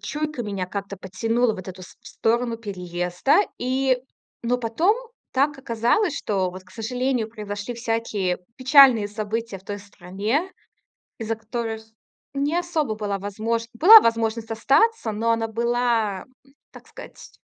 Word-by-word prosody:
чуйка 300 -4 -4
меня 200 -4 -3
как-то 200 +1 -5
потянула 225 +5 0
вот 185 - -9
в - - -7
эту 185 0 -9
в - - -7
сто - - -17
сторону 235 +1 -1
переезда, 180 - 0 0.2
и, 260 +1 +1 0.4
но 245 +1 0
потом 315 - +1 0.4
так 280 +2 +1
оказалось, 265 - +1
что 190 -3 -1
вот, 185 +1 -10
к - - -21
сожалению, 245 0 -2
произошли 210 +1 -6
всякие 225 -6 -1 0.2
печальные 260 -5 +6
события 215 0 -4
в 190 - -23
той 205 +1 -5
стране, 205 - -3 0.7
из-за 225 0 -2
которых 225 0 -5 0.5
не 285 +4 0
особо 320 -9 -1
была 205 -2 -2
возможн 220 +4 -2
была 410 - +9
возможность 230 0 0
остаться, 275 - +2
но 225 +2 0
она 225 0 0
была, 230 -3 0 0.5
так - - -15
сказать, - - -12
225 Hz, 140 wpm, -23 LUFS, 205-250 Hz, 0.7 s, была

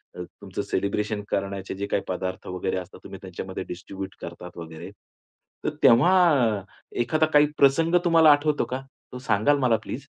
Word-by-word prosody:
अ, 90 - -6
तुमचं - - -7
सेलिब्रेशन 105 +1 -2
करण्याचे 100 -1 -3
जे 100 +1 -4
काही 100 - +1
पदार्थ 95 0 -4
वगैरे 90 +1 -2
असतात, 90 0 -8
तुम्ही 95 - -9
त्यांच्यामध्ये 95 0 -6
डिस्ट्रिब्यूट 95 +2 -7
करतात 85 +1 -9
वगैरे. 80 -1 -9 0.7
तर - - +1
तेव्हा 130 +11 +6 0.9
एखादा 155 +7 +2
काही 150 0 +7
प्रसंग 160 +5 +4
तुम्हाला 165 -3 +6
आठवतो 145 +1 +2
का? 130 +1 -4 0.3
तो 125 - -7
सांगाल 125 +4 +2
मला 125 -4 +3
प्लीज? 140 +2 -6
100 Hz, 155 wpm, -25 LUFS, 95-140 Hz, 0.9 s, काही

